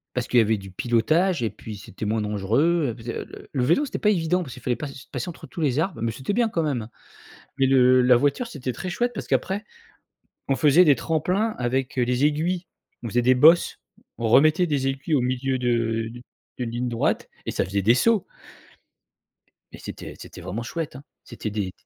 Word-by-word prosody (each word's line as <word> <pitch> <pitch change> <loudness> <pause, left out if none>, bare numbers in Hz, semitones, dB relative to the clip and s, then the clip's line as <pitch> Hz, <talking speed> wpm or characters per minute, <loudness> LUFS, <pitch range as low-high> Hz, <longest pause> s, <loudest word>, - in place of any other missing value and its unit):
Parce 125 -1 -1
qu'il 125 - +4
y - - +7
avait 110 0 +2
du 95 -1 -10
pilotage 145 - +1
et 110 - +1
puis 105 0 -9
c'était 100 +2 -8
moins 110 +1 0
dangereux, 115 - +1
heu, - - -9
parce 115 -1 -13
que 120 - -1
le - - -4
le - - -13
le 130 -4 0
vélo, 170 - +3
c'était - - -5
pas 210 - +3
évident 180 -2 +1
parce 130 -7 -9
qu'il - - -12
fallait 125 - 0
pass 135 -2 -8
passer 130 +6 -4
entre 170 - -10
tous 170 - -7
les 140 -2 +1
arbres, 165 - -2
mais 115 0 0
c'était 130 - -4
bien 235 +1 +2
quand 170 -6 -1
même, 130 -8 -2 0.7
mais 135 - +3
le 130 -1 +5
la 125 0 +5
voiture 145 - +1
c'était 135 - -4
très 185 +10 -5
chouette 240 +7 0
parce - - -5
qu'après, 195 +3 0 0.9
on 135 - +2
faisait 150 +5 +5
des 150 -4 +6
tremplins 180 - 0
avec, 130 +2 -1
heu, - - +3
les 125 +3 +1
aiguilles, 170 +5 0 0.4
on 115 - -4
faisait 120 +3 +1
des 130 +2 +5
bosses, 160 +7 +5 0.4
on 115 - -1
remettait 155 +9 +5
des 140 -4 0
aiguilles 135 +4 -2
au 140 - +3
milieu 130 +1 -1
de 115 -2 0
d 120 0 -11 0.4
d'une 125 -2 -3
ligne 120 +2 -2
droite, 115 -1 -1 0.2
et - - -1
ça - - 0
faisait 100 +1 -1
des 115 +5 +5
sauts 215 - +3 1.5
et - - -10
c'était - - -8
c'était - - -11
vraiment 95 +6 -5
chouette, 160 +3 -5
hein. 135 - -10 0.2
C'étaient 115 -2 -6
des 100 -3 -2
130 Hz, 220 wpm, -24 LUFS, 115-165 Hz, 1.5 s, y